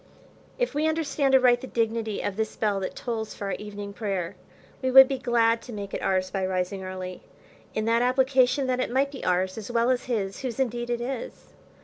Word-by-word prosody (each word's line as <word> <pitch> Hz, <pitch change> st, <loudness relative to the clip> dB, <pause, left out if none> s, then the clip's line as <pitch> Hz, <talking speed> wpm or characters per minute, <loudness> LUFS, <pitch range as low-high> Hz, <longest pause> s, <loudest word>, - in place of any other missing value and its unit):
If -, -, 0 dB
we 300 Hz, +2 st, +1 dB
understand 290 Hz, -4 st, +1 dB
aright 250 Hz, -2 st, +5 dB
the 260 Hz, -, -6 dB
dignity 225 Hz, -2 st, -1 dB
of 200 Hz, -, -2 dB
this 220 Hz, +1 st, -2 dB
bell 205 Hz, -3 st, 0 dB
that 190 Hz, -, -4 dB
tolls 225 Hz, -3 st, -4 dB
for 205 Hz, -, -6 dB
our 195 Hz, -, -2 dB
evening 205 Hz, -1 st, -7 dB
prayer, 195 Hz, -5 st, -3 dB, 0.5 s
we 260 Hz, -, 0 dB
would 265 Hz, +1 st, +10 dB
be 270 Hz, -1 st, -2 dB
glad 230 Hz, -1 st, +2 dB
to 245 Hz, -, -9 dB
make 200 Hz, -2 st, -6 dB
it -, -, -3 dB
ours 185 Hz, -1 st, 0 dB
by 190 Hz, 0 st, -2 dB
rising 185 Hz, +1 st, -2 dB
early, 185 Hz, -1 st, -6 dB, 0.5 s
in 215 Hz, -, 0 dB
that 230 Hz, +1 st, +3 dB
application, 260 Hz, +1 st, +3 dB
that 255 Hz, -1 st, 0 dB
it -, -, 0 dB
might 270 Hz, +3 st, +1 dB
be 270 Hz, -, -8 dB
ours 185 Hz, +3 st, 0 dB
as 215 Hz, -, -8 dB
well 235 Hz, +1 st, +2 dB
as 250 Hz, -, -1 dB
his, 205 Hz, -6 st, -2 dB
whose 255 Hz, -1 st, -4 dB
indeed 240 Hz, -2 st, -1 dB
it 240 Hz, 0 st, -1 dB
is. 270 Hz, -, -6 dB
230 Hz, 215 wpm, -26 LUFS, 200-260 Hz, 0.5 s, would